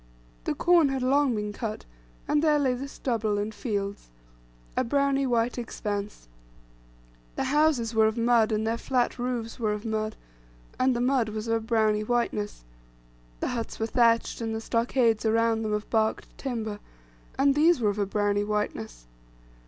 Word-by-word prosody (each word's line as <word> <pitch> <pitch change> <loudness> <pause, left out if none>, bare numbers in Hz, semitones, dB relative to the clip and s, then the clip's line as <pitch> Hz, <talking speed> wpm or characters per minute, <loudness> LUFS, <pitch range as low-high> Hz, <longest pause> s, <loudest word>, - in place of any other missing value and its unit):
The - - -1
corn 345 -4 +4
had 265 -1 -2
long 270 -1 +3
been 210 -1 -3
cut, 215 -1 -5 0.4
and 295 - +2
there 305 -2 +4
lay 270 -3 +2
the 260 +3 -5
stubble, 225 -6 -1
and 210 +2 -2
fields, 200 - -4 0.7
a - - +2
browny 275 +1 +1
white 240 0 0
expanse; 205 - -5 1.1
the - - -1
houses 290 -6 +2
were 220 -1 +4
of 220 +2 -2
mud, 230 -1 +3
and 215 0 0
their 230 +1 -1
fiat 250 -1 0
roofs 240 -1 -3
were 215 -2 0
of 210 +2 -6
mud, 215 -1 -2 0.6
and 255 0 +3
the 240 - -1
mud 250 -3 +2
was 215 +1 -5
of 225 - +1
a 225 - +2
browny 220 -2 +2
whiteness; 215 - -1 0.8
the - - 0
huts 230 -2 -4
were 225 - 0
thatched, 230 0 +2
and 225 -1 -2
the - - -2
stockades 230 -1 +1
around 225 0 +2
them 215 -1 -2
of 210 0 -2
barked 220 -1 0
timber, 220 -6 -4 0.6
and 275 +1 +4
these 315 +2 +4
were 210 -3 +2
of 205 - -6
a 200 - +1
browny 205 0 +1
whiteness. 205 - -3
230 Hz, 170 wpm, -27 LUFS, 215-250 Hz, 1.1 s, corn